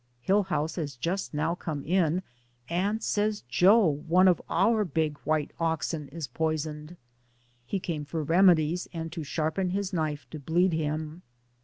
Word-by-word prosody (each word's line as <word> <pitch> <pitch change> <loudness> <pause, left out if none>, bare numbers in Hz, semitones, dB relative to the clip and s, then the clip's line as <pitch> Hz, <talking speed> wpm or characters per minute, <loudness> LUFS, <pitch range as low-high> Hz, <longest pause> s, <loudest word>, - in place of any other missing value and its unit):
Hillhouse 190 -6 +1
has 145 -5 -3
just 170 +10 -2
now 155 +3 0
come 155 -5 -5
in, 180 +1 +1 0.4
and 200 +6 -1
says 210 0 0
Joe, 195 - +5
one 165 +5 +3
of 180 -3 +3
our 210 +5 +3
big 155 -4 -1
white 155 -1 0
oxen, 160 -2 -1
is 160 +1 -5
poisoned. 155 +3 -3 0.7
He 195 - -1
came 160 -5 -4
for 155 +2 -3
remedies 170 0 +4
and 165 -1 -5
to 165 -1 -5
sharpen 160 +5 -1
his 195 +1 -2
knife 155 -3 -2
to 155 - -6
bleed 170 +5 +2
him. 155 +1 -3
165 Hz, 150 wpm, -28 LUFS, 155-185 Hz, 0.7 s, Joe